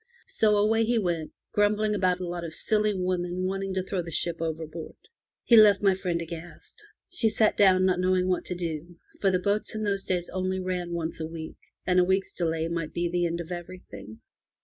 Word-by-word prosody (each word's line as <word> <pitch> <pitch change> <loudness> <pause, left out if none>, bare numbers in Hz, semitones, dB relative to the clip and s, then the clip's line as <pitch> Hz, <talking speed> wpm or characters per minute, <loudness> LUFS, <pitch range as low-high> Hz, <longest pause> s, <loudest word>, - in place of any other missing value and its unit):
So 210 -1 +3
away 220 +2 +3
he 235 +1 +1
went, 170 -6 -1 0.2
grumbling 210 +1 +2
about 185 -3 +1
a 180 - -4
lot 175 0 -4
of 160 -1 -6
silly 215 -1 +1
women 180 -1 -1
wanting 195 0 -2
to 185 - 0
throw 190 -1 -2
the 170 - -8
ship 165 +1 -1
overboard. 160 0 -5 0.5
He 240 - +5
left 205 -2 +7
my 195 -1 +5
friend 180 -2 -2
aghast. 170 - -9 0.2
She 255 -11 0
sat 215 0 +3
down, 185 -2 +5
not 185 -1 +2
knowing 185 0 +2
what 185 -1 0
to 180 - -4
do, 170 0 -5 0.2
for 195 - +3
the 185 - +2
boats 205 +4 -1
in 215 - -3
those 200 -2 -1
days 180 -2 -1
only 185 +1 -2
ran 180 -2 -3
once 165 -1 -3
a 160 - -3
week, 160 -1 -8 0.3
and 180 0 +3
a - - +6
week's 190 +2 0
delay 165 -2 -1
might 165 -2 -3
be 170 0 0
the 175 -1 +1
end 170 +1 -3
of 170 - -9
every 180 +1 -7
thing. 110 +2 -10
180 Hz, 215 wpm, -27 LUFS, 170-195 Hz, 0.5 s, left